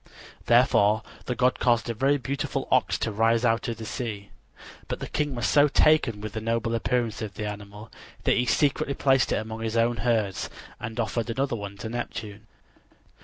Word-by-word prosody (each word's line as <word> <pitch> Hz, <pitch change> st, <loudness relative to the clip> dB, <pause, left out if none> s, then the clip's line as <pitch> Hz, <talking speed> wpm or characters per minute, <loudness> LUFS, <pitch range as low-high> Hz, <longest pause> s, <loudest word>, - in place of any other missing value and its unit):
Therefore 110 Hz, -3 st, +4 dB, 0.2 s
the 125 Hz, -, -2 dB
god 125 Hz, +1 st, +2 dB
caused 120 Hz, -1 st, +2 dB
a 115 Hz, -, -1 dB
very 135 Hz, +5 st, +2 dB
beautiful 135 Hz, +2 st, -3 dB
ox -, -, +3 dB
to -, -, -2 dB
rise 115 Hz, +3 st, +2 dB
out 115 Hz, -1 st, +1 dB
of 115 Hz, -2 st, -3 dB
the 110 Hz, -, -7 dB
sea. 110 Hz, -3 st, -5 dB, 0.6 s
But -, -, -4 dB
the -, -, -4 dB
king 145 Hz, -3 st, -2 dB
was 120 Hz, -, -2 dB
so 145 Hz, 0 st, +5 dB
taken 140 Hz, -8 st, +3 dB
with 110 Hz, -1 st, -6 dB
the 110 Hz, -, -4 dB
noble 115 Hz, +1 st, -1 dB
appearance 115 Hz, -1 st, -1 dB
of 105 Hz, -3 st, -5 dB
the 105 Hz, -, -4 dB
animal 105 Hz, +1 st, -8 dB, 0.3 s
that -, -, +3 dB
he 125 Hz, 0 st, +1 dB
secretly 140 Hz, +2 st, +1 dB
placed 135 Hz, -2 st, +3 dB
it -, -, +3 dB
among 110 Hz, +1 st, -4 dB
his 115 Hz, 0 st, -2 dB
own 115 Hz, +1 st, +2 dB
herds 110 Hz, -7 st, 0 dB, 0.3 s
and 110 Hz, +1 st, -6 dB
offered 115 Hz, 0 st, -1 dB
another 115 Hz, -4 st, -2 dB
to 105 Hz, -, -6 dB
Neptune. 110 Hz, -2 st, -6 dB
115 Hz, 185 wpm, -26 LUFS, 110-125 Hz, 0.6 s, so